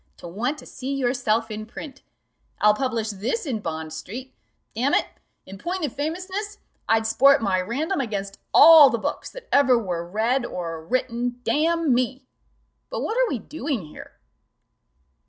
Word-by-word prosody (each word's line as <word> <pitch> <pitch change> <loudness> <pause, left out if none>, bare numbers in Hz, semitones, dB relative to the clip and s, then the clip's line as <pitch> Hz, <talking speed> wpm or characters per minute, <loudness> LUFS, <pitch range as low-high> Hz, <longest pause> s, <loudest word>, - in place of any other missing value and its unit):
to - - -10
want 235 - -2
to - - -12
see 265 +1 -6
yourself 245 -4 0
in 215 0 -5
print 270 +5 -10 0.6
I'll 210 0 +5
publish 230 -2 -2
this 225 - -3
in 250 -7 -2
Bond 160 -4 -5
street: 245 +11 -8 0.4
damn 255 +6 +1
it, - - +2 0.4
in 195 0 -11
point 355 - -2
of 265 - -5
famousness, 375 +7 -4 0.3
I'd 225 0 +3
sport 275 +5 +5
my 190 -5 +1
Random 290 - -2
against 200 -5 -4
all 320 -4 +9
the 235 - -1
books 220 - -4
that - - -11
ever 265 -3 +5
were 180 -7 -3
read 225 +8 0
or 165 -7 -5
written, 245 +4 -2
damn 325 -1 +2
me! 255 +2 -1 0.6
But - - -4
what 440 - -2
are - - +2
we 265 - -1
doing 265 - -4
here?" 150 - -13
245 Hz, 160 wpm, -24 LUFS, 210-285 Hz, 0.6 s, all